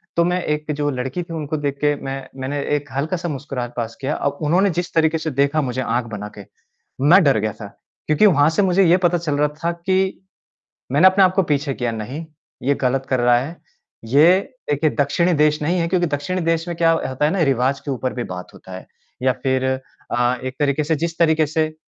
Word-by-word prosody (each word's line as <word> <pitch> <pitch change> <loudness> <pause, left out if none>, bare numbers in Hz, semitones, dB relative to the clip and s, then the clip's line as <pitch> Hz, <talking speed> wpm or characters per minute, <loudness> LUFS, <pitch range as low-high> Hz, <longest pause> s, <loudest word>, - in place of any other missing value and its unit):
तो 170 - +4
मैं 180 +1 0
एक 150 0 -2
जो 145 0 +1
लड़की 130 +6 -3
थी 165 - -9
उनको 155 -1 -3
देख 140 -1 -2
के 145 0 +3
मैं 135 0 -3 0.2
मैंने 140 +2 -3 0.2
एक 145 -2 -5
हल्का-सा 165 +5 -2
मुस्कुराहट 130 -4 -5
पास 115 -1 -3
किया, 140 +3 -1
अब 140 0 -2
उन्होंने 175 +6 +3
जिस 175 - -5
तरीके 160 0 +2
से 160 -1 -3
देखा 140 +2 +2
मुझे 130 -2 -2
आँख 120 0 -1
बना 105 0 -5
के, 100 - -9 0.6
मैं 170 +8 +6
डर 140 -6 +4
गया 110 0 -1
था। 105 - -6 0.4
क्योंकि 155 +7 +4
वहाँ 155 -5 +5
से 205 - +3
मुझे 190 0 +3
ये 170 +1 +5
पता 175 0 +3
चल 155 -4 -2
रहा 150 0 +3 0.2
था 170 - +1
कि 190 +3 -1 0.7
मैंने 150 +7 +6
अपने 190 +1 +5
आप 185 - +4
को 195 - +3
पीछे 145 -3 -1
किया 125 -2 -2
नहीं, 125 +9 -6 0.4
ये 140 +2 +2
गलत 130 +1 0
कर 130 - +1
रहा 120 0 +4
है, 145 +7 -6 0.5
ये 145 +8 +5 0.4
एक 145 - -4
ए - - +5
दक्षिणी 170 +5 +2
देश 150 0 +2
नहीं 170 +4 0
है 170 - 0
क्योंकि 175 -1 +1
दक्षिणी 155 +5 -2
देश 165 0 0
में 175 - -3
क्या 165 -1 +4
ह 165 - +3
होता 130 +3 0
है 150 - +2
ना 195 - 0
रिवाज़ 130 +2 0
के 145 - -2
ऊपर 130 0 -2
भी 120 - -3
बात 90 0 -9
होता 95 - -12
है। 95 - -9 0.4
या 130 - +4
फिर 130 -1 +1 0.5
अ, 120 +1 +2
एक 130 0 -5
तरीके 145 +1 +1
से 160 +2 0
जिस 165 +2 -3
तरीके 160 -2 +3
से 155 +1 -1
150 Hz, 230 wpm, -20 LUFS, 130-170 Hz, 0.7 s, मैं